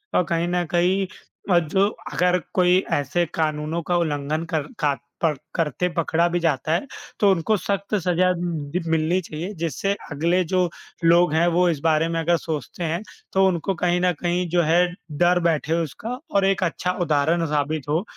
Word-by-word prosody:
अ, - - +5
कहीं 170 0 -1
न 175 0 0
कहीं 185 +3 +2 0.5
अ, 175 - +6
जो 190 +5 +1 0.3
अगर 180 +4 +2
कोई 180 0 +4 0.2
ऐसे 155 +5 +1
कानूनों 155 +1 -1
का 175 -1 +2
उल्लंघन 155 -1 -1
कर 150 -2 0
का 145 -1 +2 0.3
प 155 -3 +3 0.2
करते 165 +1 0
पकड़ा 170 +1 +2
भी 175 0 0
जाता 155 -2 0
है, 225 +11 -1 0.3
तो 205 - +5
उनको 190 +4 +1
सख्त 200 +2 -2
सजा 180 -1 +2
दि 170 -2 -3
मिलनी 165 +3 +2
चाहिए। 165 +5 -6
जिससे 170 +5 -1 0.2
अगले 170 +5 +1
जो 180 +1 +1 0.3
लोग 170 -1 +5
हैं, 165 +2 +3
वो 175 +1 +3
इस 155 -4 -1
बारे 160 0 +3
में 165 0 -1
अगर 170 +1 +2
सोचते 160 +2 -5
हैं 170 +3 -1 0.3
तो 190 0 +4
उनको 185 +1 0
कहीं 175 0 +1
न 180 0 +3
कहीं 175 0 0
जो 175 +1 +3
है, 170 +3 +4 0.3
डर 175 +4 +3
बैठे 160 -1 +1
उसका 230 - -6 0.2
और 195 -1 +4
एक 195 -1 +1
अच्छा 180 +1 -1
उदाहरण 165 +1 +2
साबित 150 0 -1
हो 160 +6 +1
170 Hz, 180 wpm, -23 LUFS, 155-180 Hz, 0.5 s, अ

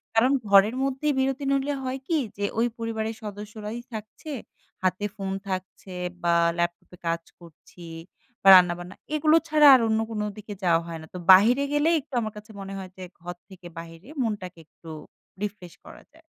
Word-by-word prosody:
কারণ, 240 +4 +4 0.2
ঘরের 200 +4 +6
মধ্যেই 275 +2 0
বিরতি 270 +1 0
নইলে 275 +1 +1
হয় 260 +1 -3
কি 330 - +1 0.2
যে, 205 - -1
ওই 235 - +3
পরিবারের 225 -1 -3
সদস্যরাই 210 +2 -7
থাকছে, 220 +8 -8 0.5
হাতে 185 +2 0
ফোন 195 -1 -4 0.2
থাকছে 185 0 -6 0.3
বা 170 0 +3 0.3
ল্যাপটপে 175 +1 -3
কাজ 165 0 -1 0.2
করছি 170 +1 -16 0.6
বা - - +1
রান্নাবান্না। 180 0 +3 0.2
এগুলো 305 +1 +4
ছাড়া 300 -1 +6
আর 255 - +3
অন্য 220 0 +1
কোনো 210 -1 -2
দিকে 210 0 -8
যাওয়া 165 -2 +3
হয় 165 -1 -6
না। 160 - -12
তো, - - -6
বাহিরে 230 +9 +6
গেলেই 305 +3 +3
একটু 275 - -26
আমার 215 -1 -4
কাছে 210 +2 -11
মনে 195 0 -7
হয় 190 -1 -8
যে, 185 - -8 0.2
ঘর 175 +1 -6
থেকে 185 -2 -12
বাহিরে 165 +6 -12
মনটাকে 195 -6 -4
একটু 165 - -15 0.5
রিফ্রেশ 190 -4 -6
করা - - -13
যায়। 325 - -20
210 Hz, 170 wpm, -25 LUFS, 180-245 Hz, 0.6 s, ঘরের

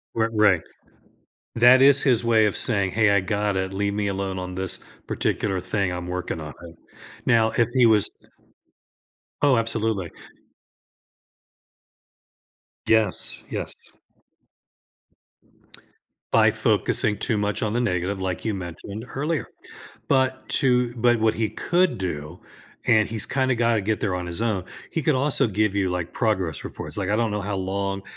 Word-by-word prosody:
R 115 0 +1
right. 105 -5 +4 0.9
That 125 +3 +6
is 140 0 +7
his 125 -4 +2
way 110 -2 +4
of 105 - -1
saying, 100 -6 +2
"Hey, 110 -1 +3
I 100 -1 +3
got 105 0 -1
it, 95 0 -2
leave 100 +1 -1
me 105 0 -1
alone 95 -1 -3
on 90 0 -6
this 95 -1 +1 0.3
particular 95 -3 -1
thing 95 +1 -1
I'm 90 0 -5
working 90 -2 -4
on," 75 -1 -8
right. 85 -1 -11 0.5
Now, 110 -1 +3
if 120 -1 +3
he 125 -2 +5
was 110 -3 +4 1.3
Oh, 140 -4 +4
absolutely. 110 -5 -1 2.8
Yes, 110 -4 +1
yes. - - -6 2.4
By - - +5
focusing 105 -1 +1
too 110 +1 0
much 105 +3 -1
on 105 - -1
the 120 - 0
negative, 95 -4 -1
like 95 -2 -3
you 110 - -1
mentioned 100 +4 -7
earlier. 150 +3 -2 0.6
But 130 -1 0
to 125 -3 +2
but 120 0 +3
what 110 0 +2
he 110 -1 -1
could 175 - 0
do, 80 -2 -5 0.5
and 110 -3 +4
he's 110 -1 0
kinda 130 -2 0
got 115 0 +2
to 110 - +1
get 105 +2 -1
there 95 -4 -1
on 90 -1 -4
his 85 +4 -3
own, 110 -6 -1 0.3
he 160 - -1
could 150 -2 +2
also 135 -2 +2
give 105 0 0
you, 95 -2 0
like, 90 -2 -4
progress 95 - -1
reports. - - -5
Like, 100 -1 -2
I 105 - +2
don't 115 -2 0
know 105 - -2
how 100 0 -3
long 95 +1 -3
105 Hz, 155 wpm, -23 LUFS, 95-115 Hz, 2.8 s, is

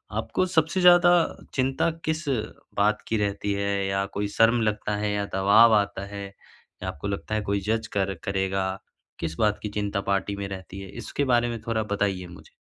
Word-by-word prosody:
आपको 185 - 0
सबसे 175 +1 +1
ज़्यादा 175 0 +7 0.4
चिंता 135 +4 +1 0.2
किस 160 +1 -1 0.5
बात 105 +1 +2
की 110 - 0
रहती 100 0 -1
है 100 0 -1
या 95 0 0
कोई 105 0 0
शर्म 115 +1 +5
लगता 105 -1 -1
है 105 0 -1
या 100 0 -1
दबाव 105 +4 +6
आता 100 -1 0
है 100 0 -5 0.6
या - - -3
आपको 85 +7 -6
लगता 100 +2 -3
है 105 - 0
कोई 100 0 -1
जज़ 110 0 0
कर 95 -1 0
करेगा 95 -1 -1 0.5
किस 80 -1 -3
बात 105 -1 +2
की 105 - -2
चिंता 100 -1 -2
पार्टी 100 +1 -1
में 100 -1 -4
रहती 95 0 -8
है? 95 - -9
इसके 145 - -4
बारे 120 -1 +3
में 115 -1 -4
थोड़ा 110 -1 0
बताइए 100 -3 -1
मुझे। 85 - -14
100 Hz, 190 wpm, -26 LUFS, 100-115 Hz, 0.6 s, ज़्यादा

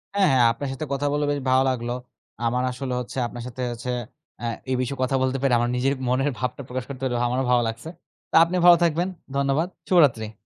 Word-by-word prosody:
হ্যাঁ, 200 -2 +4
হ্যাঁ। 130 -2 +4
আপনার 135 +4 -4
সাথে 145 +4 -5
কথা 140 +1 -1
বলে 145 0 +1
বেশ 145 - -1
ভালো 130 +1 +4
লাগলো। 120 -2 -2 0.5
আমার 125 +2 +1
আসলে 130 0 -4
হচ্ছে 125 +1 -7
আপনার 120 0 -8
সাথে 125 +1 -7
হচ্ছে 120 +1 -6 0.5
আ - - -2 0.3
এ - - +2
বিষয়ে 130 +2 -3
কথা 130 +1 0
বলতে 130 0 +1
পেরে 135 -2 +2
আমার 120 0 0
নিজের 130 +2 +1
মনের 130 +3 +1
ভাবটা 125 +2 -3
প্রকাশ 130 +1 -4
করতে 135 -2 -7
পেরে 125 -2 -1
আমারও 130 +2 0
ভালো 125 -1 +4
লাগছে। 115 +7 -5 0.4
তো - - -2
আপনি 170 +2 -2
ভালো 175 -1 +9
থাকবেন। 170 +2 +1 0.3
ধন্যবাদ। 140 +4 +1 0.2
শুভরাত্রি। 130 - +4
130 Hz, 210 wpm, -24 LUFS, 125-140 Hz, 0.5 s, ভালো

